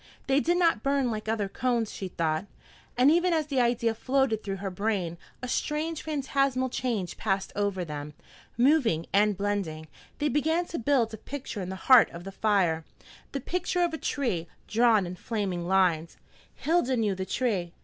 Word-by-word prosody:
They 270 Hz, +1 st, +3 dB
did 345 Hz, +4 st, +1 dB
not 335 Hz, -10 st, +3 dB
burn 275 Hz, -2 st, +1 dB
like 215 Hz, 0 st, -4 dB
other 215 Hz, -3 st, 0 dB
cones, 235 Hz, +1 st, -1 dB
she 190 Hz, -, -5 dB
thought, 165 Hz, +1 st, -1 dB, 0.5 s
and 255 Hz, +4 st, +6 dB
even 345 Hz, +2 st, +3 dB
as 315 Hz, -2 st, +1 dB
the 275 Hz, -3 st, +1 dB
idea 235 Hz, -1 st, +2 dB
floated 255 Hz, -2 st, +1 dB
through 195 Hz, -1 st, -3 dB
her 195 Hz, 0 st, -4 dB
brain, 190 Hz, -3 st, -1 dB, 0.3 s
a -, -, -2 dB
strange, 305 Hz, +5 st, -1 dB
phantasmal 275 Hz, -3 st, 0 dB
change 230 Hz, -8 st, -2 dB
passed 195 Hz, -2 st, -1 dB
over 200 Hz, -3 st, -1 dB
them. 150 Hz, -1 st, -6 dB, 0.4 s
Moving 240 Hz, -, +3 dB
and 205 Hz, 0 st, +3 dB
blending, 195 Hz, -6 st, -2 dB, 0.3 s
they 295 Hz, -, 0 dB
began 320 Hz, +5 st, +1 dB
to 335 Hz, -, -3 dB
build 235 Hz, -2 st, +2 dB
a -, -, -5 dB
picture 260 Hz, -4 st, -6 dB
in 180 Hz, -, -5 dB
the 190 Hz, -, -4 dB
heart 250 Hz, +5 st, +6 dB
of 170 Hz, +1 st, -9 dB
the 195 Hz, -, -7 dB
fire, 190 Hz, -6 st, +1 dB, 0.5 s
the 275 Hz, -, -3 dB
picture 355 Hz, +4 st, -1 dB
of 340 Hz, -2 st, 0 dB
a -, -, -2 dB
tree, 210 Hz, -, -1 dB, 0.2 s
drawn 225 Hz, -3 st, +4 dB
in 180 Hz, +1 st, -6 dB
flaming 190 Hz, -6 st, -3 dB
lines. 175 Hz, -4 st, +2 dB, 0.4 s
Hilda 285 Hz, -5 st, +1 dB
knew 215 Hz, -3 st, +1 dB
the 190 Hz, 0 st, -4 dB
tree. 195 Hz, -6 st, -1 dB
225 Hz, 180 wpm, -28 LUFS, 190-275 Hz, 0.5 s, and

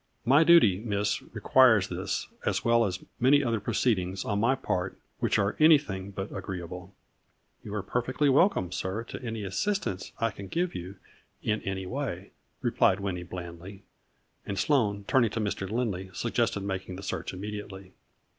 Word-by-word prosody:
My 140 Hz, +6 st, +6 dB
duty, 160 Hz, -, +6 dB
Miss, 105 Hz, -2 st, -1 dB
requires 115 Hz, -7 st, +4 dB
this -, -, -3 dB, 0.2 s
as -, -, -1 dB
well 115 Hz, 0 st, +4 dB
as 95 Hz, -2 st, -3 dB, 0.2 s
many 145 Hz, +4 st, +5 dB
other 115 Hz, -3 st, 0 dB
proceedings 100 Hz, -4 st, 0 dB
on 100 Hz, -1 st, 0 dB
my 120 Hz, +5 st, +3 dB
part 95 Hz, -8 st, -2 dB, 0.2 s
which -, -, +2 dB
are 100 Hz, 0 st, +1 dB
any 155 Hz, 0 st, +8 dB
thing 100 Hz, -9 st, -6 dB
but 95 Hz, 0 st, -6 dB
agreeable." 90 Hz, 0 st, -6 dB, 0.3 s
" -, -, -43 dB
You 105 Hz, -, -6 dB
are 105 Hz, -, -2 dB
perfectly 125 Hz, +7 st, 0 dB
welcome, 140 Hz, -, +3 dB
sir, 95 Hz, +5 st, -3 dB
to 115 Hz, -, -8 dB
any 115 Hz, -3 st, -4 dB
as 95 Hz, -, -6 dB
sistance 190 Hz, -, -1 dB
I 115 Hz, -1 st, 0 dB
can 100 Hz, 0 st, -9 dB
give 175 Hz, -, -1 dB
you, 90 Hz, +3 st, -7 dB, 0.5 s
in 105 Hz, 0 st, 0 dB
'any 95 Hz, -1 st, -3 dB
way," 105 Hz, -5 st, -4 dB, 0.3 s
replied 95 Hz, -, +3 dB
Winnie 95 Hz, -3 st, -3 dB
blandly, 90 Hz, +2 st, -8 dB, 0.6 s
and 100 Hz, -, -4 dB
Sloane, 105 Hz, -9 st, +1 dB
turning 120 Hz, -4 st, +4 dB
to 110 Hz, -, -4 dB
Mr. 100 Hz, -2 st, -2 dB
Lindley, 105 Hz, -5 st, -2 dB
suggested 115 Hz, -2 st, 0 dB
making 95 Hz, -1 st, -4 dB
the 95 Hz, -, -8 dB
search -, -, -3 dB
imme 100 Hz, +3 st, -6 dB
diately. 95 Hz, -2 st, -11 dB
100 Hz, 170 wpm, -28 LUFS, 95-120 Hz, 0.6 s, any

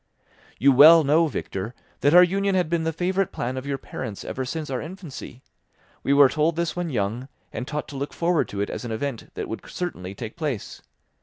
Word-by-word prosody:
"You 140 Hz, +4 st, +5 dB
well 155 Hz, +5 st, +9 dB
know, 155 Hz, +4 st, +4 dB
Victor, 110 Hz, -5 st, -5 dB, 0.2 s
that 145 Hz, +4 st, +3 dB
our 180 Hz, -, +10 dB
union 195 Hz, +2 st, +1 dB
had 175 Hz, -3 st, +1 dB
been 165 Hz, -1 st, +1 dB
the 165 Hz, -, +1 dB
favourite 185 Hz, +3 st, 0 dB
plan 125 Hz, +2 st, -3 dB
of 130 Hz, +1 st, -5 dB
your 140 Hz, -1 st, -1 dB
parents 110 Hz, -5 st, -7 dB
ever 130 Hz, -, -3 dB
since 150 Hz, +2 st, -4 dB
our 130 Hz, -, -2 dB
infancy. 160 Hz, -7 st, -9 dB, 0.6 s
We -, -, -1 dB
were 140 Hz, 0 st, +7 dB
told 155 Hz, +4 st, +1 dB
this 170 Hz, -1 st, -1 dB
when 175 Hz, -1 st, -2 dB
young, 120 Hz, 0 st, -2 dB, 0.3 s
and 125 Hz, +3 st, -4 dB
taught 150 Hz, 0 st, -4 dB
to 140 Hz, -, -7 dB
look 140 Hz, +2 st, -3 dB
forward 170 Hz, -1 st, +1 dB
to 100 Hz, -, -4 dB
it 100 Hz, -, -2 dB
as -, -, -5 dB
an 120 Hz, -, -5 dB
event 120 Hz, +1 st, -4 dB
that -, -, -4 dB
would 110 Hz, -, -5 dB
certainly 95 Hz, -, -5 dB
take 110 Hz, +1 st, -7 dB
place. 150 Hz, -10 st, -4 dB
145 Hz, 215 wpm, -24 LUFS, 125-170 Hz, 0.6 s, our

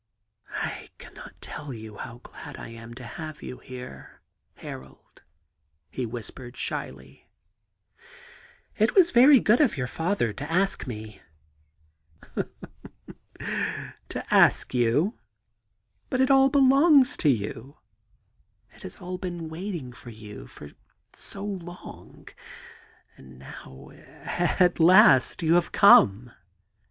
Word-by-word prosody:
*I -, -, -5 dB
cannot -, -, -13 dB
tell 145 Hz, -1 st, -8 dB
you 110 Hz, -3 st, -9 dB
how 120 Hz, 0 st, -9 dB
glad -, -, -11 dB
I -, -, -9 dB
am 115 Hz, 0 st, -11 dB
to 125 Hz, -, -10 dB
have 155 Hz, +4 st, -8 dB
you 125 Hz, -, -8 dB
here, 125 Hz, -, -11 dB, 0.3 s
Harold,' 65 Hz, 0 st, -12 dB, 0.7 s
he 125 Hz, -2 st, -4 dB
whispered 120 Hz, +2 st, -9 dB
shyly. 65 Hz, 0 st, -6 dB, 0.7 s
* -, -, -24 dB
It 220 Hz, +2 st, +2 dB
was 365 Hz, -3 st, +5 dB
very 260 Hz, +3 st, +7 dB
good 225 Hz, +4 st, +3 dB
of 255 Hz, -, +2 dB
your 125 Hz, -, -1 dB
father 160 Hz, -, -1 dB
to 145 Hz, +9 st, -7 dB
ask 195 Hz, -2 st, 0 dB
me.' 110 Hz, -3 st, -8 dB, 2.2 s
^ -, -, -4 dB, 0.2 s
To -, -, -5 dB
ask -, -, +4 dB
you 125 Hz, -, +2 dB
I -, -, -36 dB, 0.9 s
But 255 Hz, -, -1 dB
it 265 Hz, +1 st, +3 dB
all 270 Hz, 0 st, +6 dB
belongs 275 Hz, 0 st, +5 dB
to 155 Hz, -, +2 dB
you 120 Hz, +4 st, -3 dB, 1.0 s
I -, -, -20 dB
It -, -, -18 dB
has -, -, -9 dB
all 180 Hz, 0 st, -7 dB
been 175 Hz, -3 st, -5 dB
waiting 165 Hz, -6 st, -6 dB
for 120 Hz, -, -13 dB
you 105 Hz, -2 st, -11 dB
for 75 Hz, -, -12 dB, 0.4 s
so 195 Hz, 0 st, -6 dB
long 180 Hz, -3 st, -9 dB, 0.4 s
— -, -, -26 dB
and 65 Hz, -1 st, -15 dB
now, 65 Hz, 0 st, -12 dB
at 175 Hz, 0 st, -1 dB
last, 170 Hz, -5 st, +6 dB
you 160 Hz, +1 st, +3 dB
have 175 Hz, 0 st, +2 dB
come.' 120 Hz, -, +5 dB
150 Hz, 125 wpm, -26 LUFS, -, 2.2 s, very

